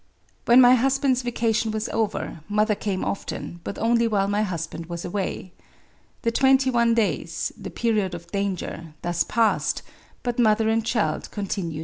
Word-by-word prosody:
• - - -41 0.4
•. - - -41
When 240 +2 +7
my 245 0 +8
husband's 260 0 +2
vacation 230 -2 0
was 215 +1 -2
over, 220 -6 -2
mother 210 +1 +2
came 200 -2 -2
often, 175 -3 -5
but - - -5
only 235 0 +2
while 200 -3 +1
my 205 +1 +1
husband 165 -4 -4
was 170 -1 -5
away. 185 0 -3 0.7
The 230 - +2
twenty 265 +1 +4
one 235 -1 +3
days 225 -3 -1
[the - - -8
period 210 -6 0
of 170 0 -9
danger'] 185 -5 -3
thus 175 -1 +1
passed; 225 -1 +1 0.4
but 245 -1 -2
mother 220 -1 +3
and 225 0 +1
child 225 -1 -1
continued 195 -5 -3
well. - - -4
215 Hz, 170 wpm, -24 LUFS, 190-235 Hz, 0.7 s, my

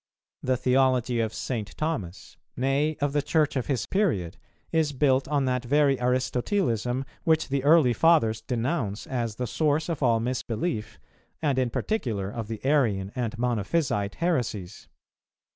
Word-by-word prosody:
The 130 0 +1
theology 125 -1 +2
of 110 -1 0
St. 110 -5 -4
Thomas, 110 - -4 0.2
nay 140 +4 +1
of 145 -1 0
the 145 - +2
Church 150 0 +1
of 130 - -1
his 130 -6 -1
period, 145 - 0 0.4
is 160 -3 +1
built 135 -1 +2
on 140 -2 +1
that 125 -1 0
very 140 +1 +3
Aristotelism, 125 - 0 0.2
which 160 -2 +2
the 135 -1 0
early 150 -4 +5
Fathers 115 -6 +3
denounce 120 -3 -2
as 120 -4 -3
the 125 - -3
source 155 +6 0
of 165 -4 -3
all 115 -4 +3
misbelief, 115 - -3 0.4
and 140 -4 +1
in 125 -2 +1
particular 115 - -2
of 115 -1 -5
the 110 +2 -6
Arian 110 -10 +2
and 120 -3 -3
Monophysite 115 -2 0
heresies. 120 - -2
130 Hz, 145 wpm, -26 LUFS, 115-145 Hz, 0.4 s, early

